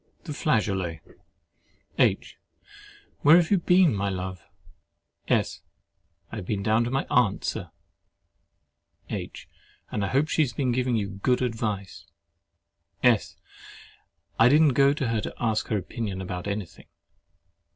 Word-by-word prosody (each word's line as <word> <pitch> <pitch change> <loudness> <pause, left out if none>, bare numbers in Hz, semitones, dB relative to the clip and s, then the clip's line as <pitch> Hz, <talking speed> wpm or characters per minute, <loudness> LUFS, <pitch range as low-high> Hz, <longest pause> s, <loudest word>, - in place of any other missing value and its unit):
THE 155 - -6
FLAGEOLET 95 - 0 1.0
H. - - +1 0.8
Where 150 +3 +7
have 175 0 +1
you 200 - +4
been, 180 -3 +4
my 100 0 -1
love? 95 -1 -5 0.9
S. - - 0 0.7
I 115 - -6
have 100 - -6
been 100 -2 -2
down 110 +2 +2
to - - -2
see - - -5
my 135 - 0
aunt, 120 -5 +2
Sir. - - -3 1.4
H. - - -6 0.4
And 105 - -2
I - - 0
hope 135 +8 +1
she 160 - +1
has 130 -6 0
been 130 -2 0
giving 125 0 0
you 105 -3 -1
good 125 +3 +2
advice. 110 -5 -4 1.0
S. 120 -4 +3 1.0
I 115 +2 +7
did 150 +4 +5
not 145 -4 +4
go 140 +2 +5
to 115 -7 -2
ask 110 -2 0
her 110 - 0
opinion 100 +1 -4
about 90 0 -5
any 100 -1 -2
thing. 80 - -19
115 Hz, 140 wpm, -26 LUFS, 100-135 Hz, 1.4 s, Where